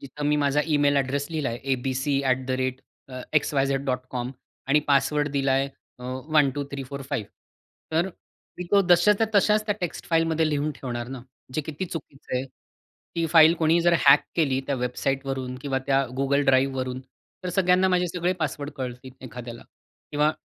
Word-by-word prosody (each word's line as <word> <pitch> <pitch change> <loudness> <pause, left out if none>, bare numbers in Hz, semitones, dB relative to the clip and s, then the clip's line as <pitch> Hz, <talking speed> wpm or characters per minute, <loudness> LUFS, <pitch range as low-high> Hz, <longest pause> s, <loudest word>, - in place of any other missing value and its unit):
जिथं 140 +2 -7
मी 150 - +3
माझा 145 0 +2
email 145 -1 +3
address 140 +1 0
लिहिला 155 -3 -1
आहे 130 +3 -1
abc@xyz.com 130 0 -1 0.4
आणि 150 +2 +4
पासवर्ड 145 +1 +2
दिला 135 -1 +1 0.4
अ, 125 - -10 0.3
1-2-3-4-5 140 -3 -1 0.6
तर 165 +3 +2 0.5
मी 180 - -4
तो 200 - +6
जशाच्या 205 +5 +5
तसाच 210 +2 +4
त्या 205 - +1
टेक्स्ट 175 -3 -4
फाईलमध्ये 165 -1 +2
लिहून 150 0 0
ठेवणार 120 -2 -5
ना 130 -1 -6 0.3
जे - - +1
किती 155 +4 -5
चुकीचं 150 -6 -7
आहे. 125 - -1
ती 165 +4 -8
फाईल 165 0 +8
कोणी 165 +1 +3
जर 175 0 +3
हॅक 140 +1 +9 0.2
केली 135 -5 +2
त्या 140 - 0
वेबसाईटवरून 130 +1 -2
किंवा 135 -2 -1
त्या 135 -1 +3 0.2
Google 140 +1 +2
Driveवरून 130 -1 +1 0.4
तर 180 - -2
सगळ्यांना 185 0 +4
माझे 180 -1 +2
सगळे 175 +1 0
पासवर्ड 145 -1 -2
कळतील 125 0 -6
एखाद्याला 120 -1 -8 0.5
किंवा 150 +1 +2
140 Hz, 140 wpm, -25 LUFS, 130-155 Hz, 0.6 s, हॅक